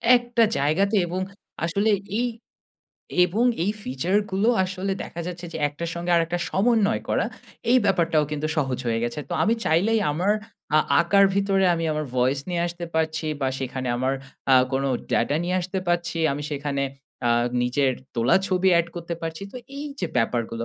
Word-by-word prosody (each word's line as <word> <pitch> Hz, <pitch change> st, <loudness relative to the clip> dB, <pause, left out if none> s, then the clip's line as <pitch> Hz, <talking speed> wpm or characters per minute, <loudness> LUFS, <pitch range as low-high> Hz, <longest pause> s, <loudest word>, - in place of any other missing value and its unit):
একটা 240 Hz, -1 st, +2 dB
জায়গাতে 190 Hz, +9 st, +2 dB
এবং 185 Hz, +2 st, -2 dB, 0.4 s
আসলে 200 Hz, +6 st, +1 dB, 0.3 s
এই 245 Hz, -, +1 dB, 1.0 s
এবং 205 Hz, +7 st, +1 dB, 0.2 s
এই 205 Hz, -, +1 dB
ফিচার 145 Hz, +10 st, -1 dB
গুলো 195 Hz, +4 st, +1 dB, 0.2 s
আসলে 190 Hz, +1 st, -3 dB
দেখা 170 Hz, -, -7 dB
যাচ্ছে 175 Hz, 0 st, -6 dB
যে 160 Hz, -, -4 dB
একটার 165 Hz, +3 st, -5 dB
সঙ্গে 175 Hz, +1 st, -3 dB
আরেকটা 170 Hz, +1 st, +1 dB
সমন্বয় 220 Hz, +1 st, +2 dB
করা -, -, +1 dB, 0.5 s
এই 255 Hz, -, +6 dB
ব্যাপারটাও 165 Hz, -5 st, +2 dB
কিন্তু 150 Hz, 0 st, -2 dB
সহজ 135 Hz, -4 st, 0 dB
হয়ে 115 Hz, -1 st, 0 dB
গেছে। 120 Hz, +5 st, -3 dB
তো -, -, -5 dB
আমি 225 Hz, +2 st, +3 dB
চাইলেই 200 Hz, +8 st, +3 dB
আমার 185 Hz, +7 st, +1 dB, 0.4 s
আ -, -, +7 dB, 0.2 s
আঁকার 195 Hz, +4 st, +5 dB
ভিতরে 195 Hz, -1 st, +2 dB
আমি 165 Hz, 0 st, -2 dB
আমার 155 Hz, 0 st, -2 dB
ভয়েস 130 Hz, +2 st, +2 dB
নিয়ে 175 Hz, -1 st, 0 dB
আসতে 170 Hz, 0 st, -6 dB
পারছি 160 Hz, 0 st, 0 dB
বা 135 Hz, -, +1 dB
সেখানে 130 Hz, -1 st, -3 dB
আমার 130 Hz, +2 st, 0 dB, 0.4 s
আ -, -, +9 dB, 0.2 s
কোনো 135 Hz, +1 st, +1 dB, 0.2 s
ডাটা 140 Hz, +5 st, +2 dB
নিয়ে 180 Hz, +1 st, 0 dB
আসতে 185 Hz, +2 st, -3 dB
পারছি। 175 Hz, -1 st, 0 dB
আমি 145 Hz, -, -4 dB
সেখানে 140 Hz, -1 st, -2 dB, 0.5 s
আ -, -, +3 dB, 0.3 s
নিজের 130 Hz, +2 st, +2 dB, 0.2 s
তোলা 120 Hz, +1 st, +3 dB
ছবি 185 Hz, 0 st, +2 dB
এড 170 Hz, -, +1 dB
করতে 170 Hz, 0 st, -4 dB
পারছি। 165 Hz, +2 st, -4 dB
তো -, -, -7 dB, 0.2 s
এই 290 Hz, -, -5 dB, 0.2 s
যে 175 Hz, -, 0 dB
ব্যাপারগুলো 115 Hz, -1 st, 0 dB
170 Hz, 170 wpm, -24 LUFS, 140-190 Hz, 1.0 s, আ